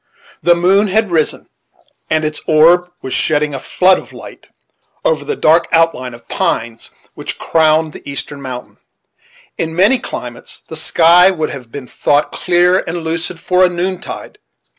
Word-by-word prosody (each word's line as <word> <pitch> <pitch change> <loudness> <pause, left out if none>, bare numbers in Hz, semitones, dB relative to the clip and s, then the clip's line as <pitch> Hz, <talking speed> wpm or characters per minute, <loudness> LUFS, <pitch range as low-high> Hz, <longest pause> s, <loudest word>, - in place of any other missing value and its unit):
The 175 +2 +4
moon 190 +4 +3
had 210 0 0
risen, 160 -3 -1 0.6
and 155 0 +1
its 155 0 -4
orb 170 +3 +4
was 130 - -4
shedding 150 -1 0
a 135 - -4
flood 185 +7 +2
of - - -14
light - - -13 0.6
over - - +1
the 440 - -3
dark 165 - +3
outline 165 -7 +1
of 120 - -18
pines 115 0 -2 0.2
which - - -6
crowned 155 -1 +2
the - - -10
eastern 140 0 -6
mountain. 125 -2 -8 0.8
In 160 0 -3
many 205 +9 +3
climates 120 - -8
the 160 - -8
sky 170 +3 +5
would 160 -5 -2
have 125 -4 -9
been 140 0 -7
thought 145 +4 0
clear 180 +1 +2
and 170 0 -5
lucid 165 +1 -4
for 180 +2 +2
a 180 - +5
noontide. 180 +1 -5
165 Hz, 160 wpm, -15 LUFS, 150-180 Hz, 0.8 s, sky